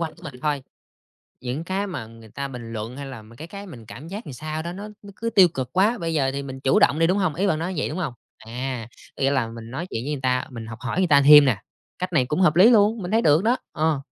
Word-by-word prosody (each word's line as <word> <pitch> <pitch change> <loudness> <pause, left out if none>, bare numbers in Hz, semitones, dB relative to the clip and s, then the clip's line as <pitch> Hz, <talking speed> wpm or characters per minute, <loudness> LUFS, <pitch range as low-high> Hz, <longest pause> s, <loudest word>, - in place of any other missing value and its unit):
quanh 160 -2 -3
của 175 - -19
mình 155 -6 -8
thôi. 145 -3 0 0.8
Những 130 +6 -4
cái 190 +3 -2
mà 175 - -5
người 115 -1 -15
ta 140 +6 -5
bình 120 -4 -8
luận 110 +3 -5
hay 140 - -6
là 130 -5 -8
mấy 115 +2 -16
cái 160 - -8
cái 200 +3 -9
mình 120 - -11
cảm 140 +7 -10
giác 200 +6 -6
sao 155 +4 -5
đó, 170 - -5
nó 200 +3 -7
nó 205 - -12
cứ 230 +1 -3
tiêu 195 -5 +6
cực 130 -6 -5
quá. 210 +6 +3
Bây 165 -4 -3
giờ 135 -3 +1
thì 140 0 -3
mình 135 -1 -7
chủ 135 0 +3
động 145 +3 +4
đi, 165 - +4
đúng 185 +3 +2
hông? 180 -7 0
Ý 195 +4 +1
bạn 155 -5 +1
nói 175 +3 -3
như 165 - -3
vậy, - - -1
đúng 155 - -5
hông? 160 -9 -2 0.2
À, 120 +1 -5 0.3
có - - -7
nghĩa 135 - +3
là 135 -5 +1
mình 115 0 -9
nói 160 +7 -4
chuyện 115 - -4
với 150 - -2
người 145 -3 -3
ta, 125 0 +1
mình 115 -3 -8
học 110 0 -8
hỏi 130 +9 -2
người 185 - +3
ta 145 -3 +6
thêm 150 +1 +9
nè. 110 -8 +1 0.4
Cách 180 -1 -3
này 130 -5 +3
cũng 150 +8 -1
hợp 165 -3 +4
lý 190 +6 +8
luôn, 220 -1 +4
mình 180 0 -5
thấy 225 +1 +3
được 155 +1 +4
đó. 240 +3 +3
Ờ. 155 -2 0
150 Hz, 300 wpm, -23 LUFS, 125-180 Hz, 0.8 s, thêm